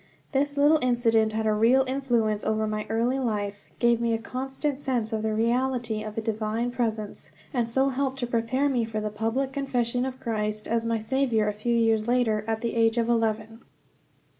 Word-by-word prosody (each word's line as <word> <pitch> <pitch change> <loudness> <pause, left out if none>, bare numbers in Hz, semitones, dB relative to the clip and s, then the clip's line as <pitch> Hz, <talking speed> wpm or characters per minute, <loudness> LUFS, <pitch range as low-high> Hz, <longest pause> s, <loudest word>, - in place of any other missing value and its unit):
This 285 0 0
little 295 +2 +5
incident 230 -3 +2
had 220 0 -1
a 215 - +3
real 240 +5 +4
influence 240 -6 0
over 220 0 0
my 215 0 -3
early 235 +4 +1
life, 205 -5 -3
gave 235 -1 +3
me 230 -1 +1
a - - 0
constant 265 +4 -3
sense 245 -5 -1
of 220 - -1
the 220 0 -1
reality 235 -1 0
of 215 0 -7
a - - 0
divine 220 +2 -2
presence, 220 -4 -3 0.2
and 240 -3 0
so 265 +3 +2
helped 270 0 -1
to 255 - -2
prepare 240 +4 0
me 255 -4 +1
for 220 -1 -3
the 210 0 -3
public 225 +6 -1
confession 250 -3 0
of 260 0 -4
Christ 215 -2 -2
as 230 0 0
my 230 0 +1
Saviour 225 -1 +1
a 210 - 0
few 235 +3 -1
years 225 -1 +2
later, 235 -4 +2
at 225 0 -1
the 235 - -2
age 225 0 +2
of 235 0 +1
eleven. 225 0 0
230 Hz, 195 wpm, -26 LUFS, 220-255 Hz, 0.2 s, little